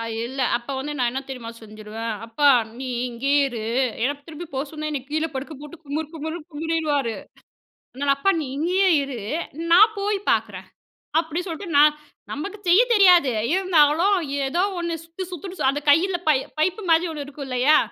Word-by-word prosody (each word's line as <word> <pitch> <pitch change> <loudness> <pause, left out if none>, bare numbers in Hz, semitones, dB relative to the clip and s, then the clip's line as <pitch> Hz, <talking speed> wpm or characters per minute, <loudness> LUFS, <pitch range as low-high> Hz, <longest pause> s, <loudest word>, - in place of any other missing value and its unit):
அ 230 - -3 0.2
இல்ல 260 +3 -5 0.2
அப்ப 240 +1 -9
வந்து 290 +3 -4
நான் 245 -2 +1
என்ன 260 +2 -3
தெரியுமா 250 -4 -7
செஞ்சுருவேன். 215 +1 -6
அப்பா 230 +6 0 0.3
நீ 265 - -5 0.2
இங்கேயே 275 +4 +1
இரு 235 -3 -6 0.4
ஏன்னா 275 +4 +1
திருப்பி 325 +1 -8
போ 265 - -1
சொன்னா 305 -1 -5
என்ன 290 -2 -2
கீழே 315 +2 0
படுக்க 275 +4 -5
போட்டு 295 +3 -10
குமறு 295 +2 -3
குமுறுன்னு 320 +1 -6
குமறிடுவாரு, 295 -5 -1 0.8
அதனால 275 +2 +1
அப்பா 335 +8 +2
நீ 300 - -4
இங்கேயே 360 +6 +2 0.2
இரு 275 -3 -5 0.5
நான் 425 +6 +7
போய் 405 0 0
பார்க்குறேன். - - -1 0.5
அப்டி 325 +1 -3
சொல்ட்டு 345 +3 -6
நான் 300 +1 +7 0.4
நமக்கு 395 +9 -5
செய்ய 355 +6 +7
தெரியாது 360 -9 +6 0.2
இருந்தாலும் 360 +1 +3 0.3
ஏதோ 340 +7 0 0.2
ஒண்ணு 340 -1 -2
சுத்து 335 +3 -7
சுத்துனு 365 +2 -7
சு - - -1
அந்த 285 +2 -2
கையில 350 +5 +4
பை 300 - +5 0.2
பைப்பு 370 +7 +1
மாரி 330 +1 +4
ஒண்ணு 290 -2 -5
இருக்குல்லையா, 275 0 +2
300 Hz, 165 wpm, -23 LUFS, 270-345 Hz, 0.8 s, நான்